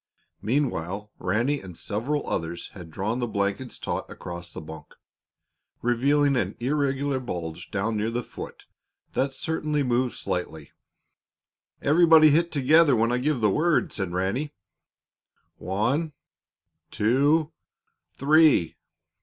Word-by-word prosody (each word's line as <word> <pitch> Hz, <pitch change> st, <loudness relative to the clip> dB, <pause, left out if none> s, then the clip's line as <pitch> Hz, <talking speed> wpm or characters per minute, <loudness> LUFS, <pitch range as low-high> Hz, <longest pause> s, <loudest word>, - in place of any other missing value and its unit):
Meanwhile, 105 Hz, -, -1 dB
Ranny 120 Hz, +10 st, 0 dB
and 90 Hz, -3 st, -11 dB
several 130 Hz, +8 st, -2 dB
others 85 Hz, +1 st, -3 dB
had 90 Hz, -4 st, -11 dB
drawn 105 Hz, +9 st, -2 dB
the 120 Hz, -, -1 dB
blankets 100 Hz, +3 st, -2 dB
taut -, -, -4 dB
across 85 Hz, 0 st, -8 dB
the -, -, -7 dB
bunk, 80 Hz, -1 st, -11 dB, 0.9 s
revealing 140 Hz, +4 st, +2 dB
an 100 Hz, -5 st, -1 dB
irregular 140 Hz, +1 st, 0 dB
bulge 85 Hz, -10 st, -6 dB
down 105 Hz, +2 st, -1 dB
near 105 Hz, +2 st, 0 dB
the 120 Hz, +1 st, -2 dB
foot -, -, -10 dB, 0.5 s
that 135 Hz, +1 st, 0 dB
certainly 150 Hz, +1 st, -1 dB
moved 125 Hz, 0 st, 0 dB
slightly. 80 Hz, -4 st, -4 dB, 1.1 s
"Everybody 160 Hz, 0 st, +6 dB
hit 170 Hz, +3 st, +2 dB
together 145 Hz, 0 st, +5 dB
when 115 Hz, +1 st, +2 dB
I 125 Hz, -, +1 dB
give 140 Hz, -1 st, 0 dB
the 105 Hz, -2 st, +3 dB
word," 160 Hz, -, +1 dB
said 95 Hz, -4 st, -2 dB
Ranny. 100 Hz, +12 st, -2 dB, 1.0 s
"One, 125 Hz, -, -1 dB, 0.8 s
two 145 Hz, +8 st, +2 dB, 0.6 s
three!" 150 Hz, -, +4 dB
120 Hz, 120 wpm, -25 LUFS, 100-145 Hz, 1.1 s, Everybody